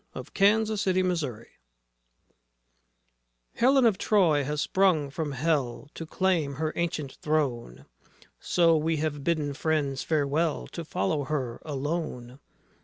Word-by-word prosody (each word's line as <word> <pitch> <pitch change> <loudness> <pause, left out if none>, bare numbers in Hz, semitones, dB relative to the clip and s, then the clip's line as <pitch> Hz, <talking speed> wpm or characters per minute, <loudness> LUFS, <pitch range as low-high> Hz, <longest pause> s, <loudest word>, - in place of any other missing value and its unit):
DESTROYER - - -4
OF - - -10 0.5
SHIPS, 205 - -2
MEN, 185 -1 +2
CITIES 125 -9 -4 2.1
Helen 265 +1 +4
of 215 -5 +3
Troy 170 -9 +3
has 150 +2 -3
sprung 160 -4 +2
from 150 -1 -3
Hell 140 -2 -1
To 165 - -7
claim 165 -6 0
her 155 +2 -2
ancient 160 -5 -2
throne, 135 - -1 0.5
So 170 -2 +3
we 160 +1 0
have 145 -2 -2
bidden 155 -3 0
friends 145 -3 -1
farewell 155 +1 0
To 170 - -6
follow 145 0 -1
her 130 -5 -3
alone. 140 -4 -4
155 Hz, 125 wpm, -27 LUFS, 140-170 Hz, 2.1 s, Helen